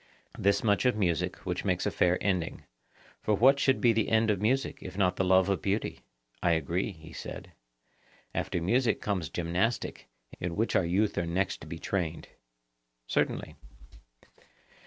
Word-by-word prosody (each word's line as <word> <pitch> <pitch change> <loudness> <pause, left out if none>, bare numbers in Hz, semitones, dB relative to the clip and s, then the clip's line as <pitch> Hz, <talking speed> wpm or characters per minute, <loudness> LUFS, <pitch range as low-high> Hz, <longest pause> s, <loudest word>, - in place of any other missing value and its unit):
Thus 100 +5 +2
much 105 +1 +2
of 125 - +2
music, 85 -7 0
which - - -2
makes - - 0
a - - +1
fair 90 0 +2
ending; 90 -4 -1 0.6
for 105 - +2
what 135 +6 +5
should 135 -1 +3
be 120 -2 +4
the 110 -1 +1
end 110 0 +3
of 100 -2 -1
music 130 +5 0
if 90 +1 -8
not 90 -3 +2
the - - 0
love 95 0 +4
of 100 -1 0
beauty? 100 +2 -1 0.4
I 85 - +3
agree, 85 +6 -1
he 80 -1 -13
said. - - -8 0.8
After - - -1
music 115 +8 +2
comes 95 -8 -2
gymnastic, 90 +7 -1 0.3
in 85 -1 -3
which 115 +2 0
our 90 - +3
youth 100 +5 +1
are 85 - -2
next 95 +4 -1
to - - -9
be 85 - -6
trained. 85 -2 -3 0.8
Certainly. - - -1
95 Hz, 165 wpm, -29 LUFS, 85-110 Hz, 0.8 s, what